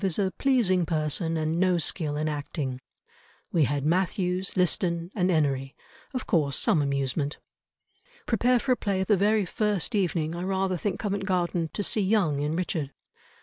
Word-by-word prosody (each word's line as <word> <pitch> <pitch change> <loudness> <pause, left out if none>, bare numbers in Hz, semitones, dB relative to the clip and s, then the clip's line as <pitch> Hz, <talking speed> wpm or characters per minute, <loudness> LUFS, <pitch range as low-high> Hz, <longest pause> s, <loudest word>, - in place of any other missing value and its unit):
is 190 -4 +1
a 195 -2 +1
pleasing 230 -10 +3
person 160 +1 -1
and 160 +1 -1
no 185 -1 +3
skill 155 -2 -1
in 155 +1 -1
acting. 145 -3 -4 0.7
We 160 -4 +3
had 140 +2 -1
Mathews, 185 +2 0
Liston, 175 -1 +1
and 185 -3 +1
Enery; 140 -5 0 0.4
of 255 -3 -4
course 145 -5 +1
some 155 - +3
amusement." 140 +1 -1 0.9
"Prepare 245 +2 +2
for 255 +2 -1
a - - +5
play 195 -4 -1
the 210 +2 +3
very 205 +1 +2
first 210 +3 -1
evening, 170 -5 0
I 175 - -4
rather 190 0 0
think 195 +2 -2
Covent 200 -2 -2
Garden, 175 -3 0
to 205 - -2
see 210 - +2
Young 190 -8 +2
in 150 +2 -1
Richard." 165 -5 -2
175 Hz, 165 wpm, -27 LUFS, 155-195 Hz, 0.9 s, a